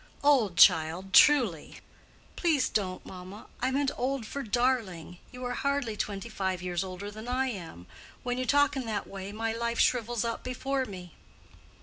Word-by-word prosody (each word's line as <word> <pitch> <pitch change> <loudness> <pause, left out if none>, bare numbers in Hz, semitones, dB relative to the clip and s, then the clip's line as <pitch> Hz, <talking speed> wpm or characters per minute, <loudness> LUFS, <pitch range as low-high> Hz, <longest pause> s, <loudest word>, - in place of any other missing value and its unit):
"Old, 250 -11 +3
child, 175 +2 +5
truly." 240 - +5 0.6
"Please 320 -6 +2
don't, 185 -3 -2
mamma! 185 +3 -10
I 255 - +1
meant 275 +1 +1
old 260 -1 -2
for 280 +6 -5
darling. 220 - -1
You 250 -1 -7
are 245 - -2
hardly 280 -4 -1
twenty 200 +1 -4
five 190 -5 -2
years 180 0 -2
older 190 +2 -7
than 215 +2 -9
I 260 +1 0
am. 165 - -8 0.4
When 245 0 -2
you 255 - -1
talk 285 0 +3
in 260 -3 -3
that 215 -2 -2
way 195 0 -7
my 225 +1 -2
life 235 0 -2
shrivels 240 -1 +1
up 230 -1 -3
before 260 +1 -2
me." 180 -5 -9
225 Hz, 165 wpm, -29 LUFS, 190-255 Hz, 0.6 s, child